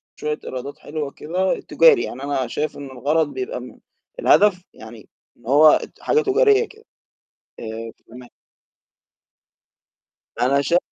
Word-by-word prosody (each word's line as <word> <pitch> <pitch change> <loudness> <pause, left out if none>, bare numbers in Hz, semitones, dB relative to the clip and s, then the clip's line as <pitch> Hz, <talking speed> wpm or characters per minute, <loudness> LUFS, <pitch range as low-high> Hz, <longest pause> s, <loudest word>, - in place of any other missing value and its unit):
شوية 150 0 -4
إيرادات 130 +2 -7
حلوة 150 -2 -5
كده 180 +7 -2
تجاري، 470 -6 +4
يعني 130 +3 -7
أنا 140 -3 -2
شايف 150 +5 -3
إن 145 - -8
الغرض 145 +5 0
بيبقى 390 +6 -5
م - - -12 0.4
الهدف 205 - +4
يعني 110 0 -13 0.3
إن 120 - -24
هو 145 +5 +6
اد - - +3
حاجة 455 - +2
تجارية 425 +1 +3
كده، 435 +1 -19 0.8
آآ 115 0 -7
فتمام. 125 +1 -15 2.1
أنا 140 +3 +2
شا 170 +5 +2
150 Hz, 130 wpm, -21 LUFS, 130-210 Hz, 2.1 s, هو